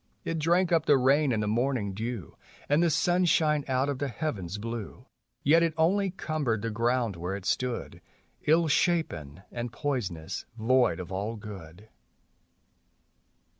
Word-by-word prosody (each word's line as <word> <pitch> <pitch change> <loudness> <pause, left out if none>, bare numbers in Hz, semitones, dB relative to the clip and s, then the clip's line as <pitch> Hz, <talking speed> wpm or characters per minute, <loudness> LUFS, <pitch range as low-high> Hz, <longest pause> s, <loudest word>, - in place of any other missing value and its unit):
It 165 -1 -2
drank 175 +3 +2
up 165 -2 +2
the 145 - +6
rain 135 +2 +3
and 110 -2 0
the - - -1
morning 115 -2 0
dew, 110 0 -5 0.3
And 145 +3 +3
the 170 - +4
sunshine 165 -2 +2
out 130 +1 +1
of 140 -2 -2
the 145 - -1
heavens 105 - -4
blue; 115 +2 -6 0.4
Yet 160 +4 +5
it 165 -2 +1
only 190 +5 +3
cumbered 150 - -2
the 115 - -1
ground 115 -1 0
where 90 +3 -3
it 100 -2 -7
stood, 125 +1 -2 0.5
lU 165 +2 +4
shapen 115 - 0
and 120 -1 -4
poisonous, 115 - -3
void 120 -5 +3
of 90 0 -7
all 100 +4 -3
good. 100 -3 -10
125 Hz, 150 wpm, -28 LUFS, 105-155 Hz, 0.5 s, the